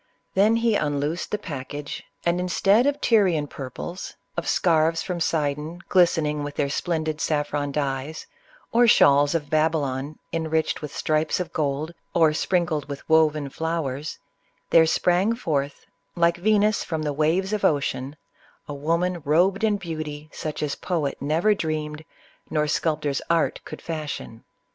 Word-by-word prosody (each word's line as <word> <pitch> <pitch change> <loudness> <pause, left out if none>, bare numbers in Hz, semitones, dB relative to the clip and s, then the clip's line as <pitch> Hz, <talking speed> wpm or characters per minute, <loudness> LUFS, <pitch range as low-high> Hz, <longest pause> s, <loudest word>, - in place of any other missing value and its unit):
Then 210 +4 +4
he 230 -1 +2
unloosed 150 -1 -1
the 210 - -1
package, 145 -5 -6 0.2
and 170 +1 +2
instead 195 +7 +3
of 285 0 0
Tyr 215 -4 +4
ian 160 -4 0
purples, 145 +7 -7 0.2
of - - -2
scarfs 165 -2 +2
from 180 -2 -3
Sidon 155 +1 -1
glistening 160 -5 +3
with 145 0 -5
their 140 -1 0
splendid 155 -1 -2
saffron 145 -1 -1
dyes, 140 +1 -3 0.5
or 240 +1 +5
shawls 145 -6 +5
of 150 -3 -2
Babylon 155 -2 0 0.2
enriched 160 -1 0
with 150 - -6
stripes 155 +2 0
of 180 - -4
gold 150 +2 -1 0.2
or 160 -3 +5
sprinkled 160 -3 0
with 140 -1 -7
woven 155 -2 +3
flowers, 155 -1 -3 0.5
there 160 -1 +6
sprang 180 +7 +2
forth, 145 - -2 0.3
like 170 -1 +3
Venus 210 +2 +2
from 160 -2 -3
the 150 -1 -1
waves 165 +7 +1
of 210 - -1
Ocean, 140 -1 0 0.5
a 145 - -5
woman 170 +5 0
robed 180 +8 +2
in 215 -2 +3
beauty 155 -4 -6
such 155 -1 -4
as 145 -2 -1
poet 160 -6 -2
never 160 +9 +2
dreamed, 155 -4 -3 0.5
nor 150 -1 +1
sculptor's 150 -2 0
art 165 -1 +1
could - - -9
fashion. 150 -8 -5
155 Hz, 145 wpm, -24 LUFS, 145-175 Hz, 0.5 s, there